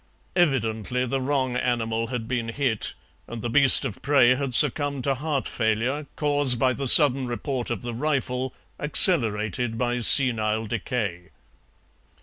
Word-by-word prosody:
Evidently 125 - -1
the 135 +2 -4
wrong 130 -2 -2
animal 115 -2 -3
had 115 -2 -6
been 120 -2 -4
hit, 115 -3 -3 0.3
and 115 -1 -9
the 120 - -4
beast 135 +1 +5
of 100 - -7
prey 135 -4 +3
had 130 -1 -2
succumbed 140 +2 0
to 140 - 0
heart 140 0 -4
failure, 120 +6 -3
caused 145 -4 0
by 130 +1 0
the 135 +2 -5
sudden 135 -2 +6
report 125 +1 -5
of 120 -2 -5
the 120 -1 -6
rifle, 130 -1 -3 0.3
accelerated 115 - +4
by 120 +1 -2
senile 110 -3 +3
decay. 105 -5 -5
125 Hz, 140 wpm, -23 LUFS, 115-140 Hz, 0.3 s, sudden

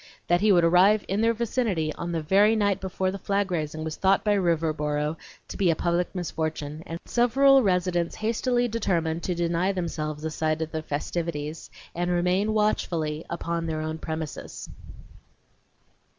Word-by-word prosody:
That 175 +1 +2
he 210 0 +4
would 175 -3 +5
arrive 185 +5 +5
in 200 +3 0
their 230 0 +3
vicinity 220 -9 -1
on 170 - -5
the 165 -2 -2
very 205 +7 +4
night 205 -2 +1
before 190 0 -1
the 195 - -6
flag 200 0 -1
raising 155 -2 -2
was 160 -1 -4
thought 195 0 +3
by 210 - +3
Riverboro 155 -4 0 0.3
to - - -7
be 190 -3 +2
a 165 - +3
public 175 +3 -1
misfortune, 155 -3 -3
and 165 +1 -5
several 270 +3 +4
residents 180 -4 0
hastily 240 +2 0
determined 170 -8 -1
to 180 +2 -2
deny 170 +2 +1
themselves 155 -5 -4
a 160 - -2
sight 155 +1 -1
of 160 - -7
the 160 - -3
festivities 155 0 -4 0.2
and 175 +1 -2
remain 180 +4 +1
watchfully 165 -7 0 0.2
on 170 0 -1
their 155 -1 -2
own 155 0 -4
premises. 160 -3 -6
175 Hz, 165 wpm, -26 LUFS, 160-200 Hz, 0.3 s, would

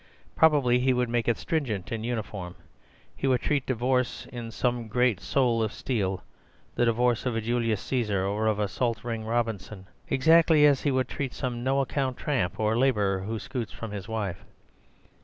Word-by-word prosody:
Probably 140 -6 +4
he 130 +1 +3
would 125 -1 0
make 120 -1 0
it 120 - +2
stringent 115 - -2
and 110 -1 -3
uniform. 105 -6 -4 0.6
He 135 - -2
would 130 -2 +2
treat 140 -3 0
divorce 125 0 0
in 120 -2 -5
some 120 0 -1
great 120 -2 +2
soul 120 -3 +1
of 110 -1 0
steel—the 100 +1 -4
divorce 120 +1 +1
of 120 - -1
a - - +1
Julius 115 -2 0
Caesar 105 -7 -1
or 105 +3 0
of 110 -2 +2
a 105 -1 0
Salt 115 +2 -2
Ring 115 -2 -3
Robinson— 110 -4 -2 0.2
exactly 160 +2 +5
as 140 -3 +4
he 145 - +1
would 130 -2 +1
treat 135 -3 -4
some 120 -2 -3
no 135 +2 +2
account 135 -1 -2
tramp 100 - -1
or 110 0 +1
labourer 105 -7 +2
who 110 +4 -4
scoots 120 -1 -5
from 115 -2 -7
his 100 -1 -6
wife. 105 -4 -3
120 Hz, 175 wpm, -27 LUFS, 110-130 Hz, 0.6 s, exactly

